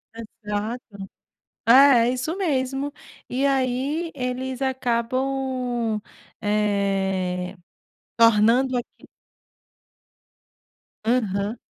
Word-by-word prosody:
Exato. 215 0 -6 0.7
É 230 - +8 0.3
é - - +2
isso 260 +7 -3
mesmo. 275 -4 -1 0.4
E 265 +3 0
aí 275 +5 0
eles 255 0 -3
acabam, 250 -2 -1 0.4
eh, 195 -3 0 0.6
tornando 230 +3 +4
aqui 240 - -8 2.0
Aham. 215 -2 0
245 Hz, 65 wpm, -23 LUFS, 210-260 Hz, 2.0 s, É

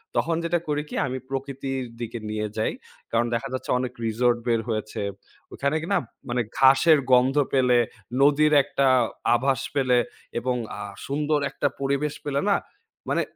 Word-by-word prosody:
তখন 165 0 +1
যেটা 170 0 +1
করি 150 0 0
কি, - - -6
আমি 130 +1 -3
প্রকৃতির 135 -1 -3 0.2
দিকে 115 0 -4
নিয়ে 105 0 -2
যাই। 110 - +1 0.4
কারণ 120 +1 +2
দেখা 115 +3 -1
যাচ্ছে 130 - -5
অনেক 125 -1 -3
রিসোর্ট 120 +2 +2
বের 115 -1 +2
হয়েছে। 110 -1 -3 0.5
ওখানে 140 +2 0 0.2
না - - +4 0.3
মানে 120 0 +1 0.2
ঘাসের 135 +4 +6
গন্ধ 125 +2 +5 0.2
পেলে, 125 -2 +4 0.4
নদীর 150 +2 +5
একটা 140 - 0 0.5
আভাস 130 +1 +1
পেলে 130 -3 +3 0.4
এবং 125 +1 -1 0.2
আ - - -7 0.3
সুন্দর 150 +2 +1
একটা 145 - 0
পরিবেশ 140 +2 0
পেলে 140 -1 0
না, 200 - +5 0.5
মানে - - +2
135 Hz, 155 wpm, -25 LUFS, 120-145 Hz, 0.5 s, ঘাসের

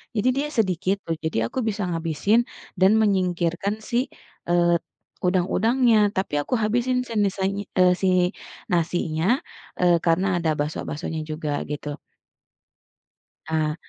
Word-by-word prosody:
Jadi, 215 +3 +1
dia 290 - 0
sedikit 190 -1 +1
tuh. 165 - -1
Jadi, 160 -7 -1
aku 115 - -7
bisa 205 -2 -2
ngabisin 165 +7 +1 0.3
dan 190 +1 +5
menyingkirkan 185 -1 +1
si, 235 - +1 0.5
eee 175 0 +4 0.5
udang-udangnya. 225 +7 +3 0.2
Tapi, 190 -5 -1
aku 200 - -5
habisin 245 +4 +1
senisanya 200 -2 0 0.2
eee, 180 0 +6
si 190 - +2 0.7
nasinya, 165 -1 0 0.5
eee, 175 -1 +5
karena 170 +3 +3
ada 165 -2 0
bakso-baksonya 155 +1 -3
juga, 155 -2 -2
gitu. 145 0 -4 1.5
Nah 155 -1 0
180 Hz, 115 wpm, -24 LUFS, 160-205 Hz, 1.5 s, eee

